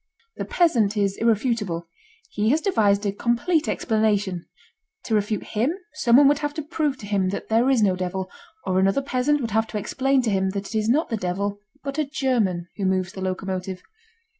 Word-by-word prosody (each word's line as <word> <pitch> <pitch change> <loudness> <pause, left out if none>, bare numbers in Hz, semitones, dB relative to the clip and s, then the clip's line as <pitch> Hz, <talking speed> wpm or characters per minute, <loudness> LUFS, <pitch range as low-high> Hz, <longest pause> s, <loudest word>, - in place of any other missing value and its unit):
The - - -3
peasant 230 - +2
is 200 -1 +1
irrefutable. 215 -7 0 0.4
He 210 +1 0
has 300 +5 +3
devised 215 - +2
a 200 - +1
complete 240 - 0
explanation. 205 -6 0 0.6
To 225 - -3
refute 210 0 0
him 235 +9 0 0.2
someone 270 -1 +5
would 290 +1 +3
have 295 -1 -3
to 310 - -3
prove 300 -3 -1
to - - -8
him 200 -2 0
that 195 - -5
there 230 +4 +3
is 250 -5 +3
no 190 -3 +3
devil, 185 +1 -3 0.4
or 185 0 +1
another 195 +8 +2
peasant 275 +2 +1
would 230 -3 -3
have 220 +2 +1
to 215 - -4
explain 265 +5 +1
to 225 - 0
him 190 -1 +1
that 200 +2 -5
it - - -5
is 215 0 +1
not 300 +7 +2
the 225 - -1
devil 200 +2 -2 0.2
but 280 +1 -4
a 300 -2 -1
German, 220 - 0
who 200 - -2
moves 185 0 0
the 190 - -7
locomotive. 185 0 -3
215 Hz, 195 wpm, -24 LUFS, 195-265 Hz, 0.6 s, someone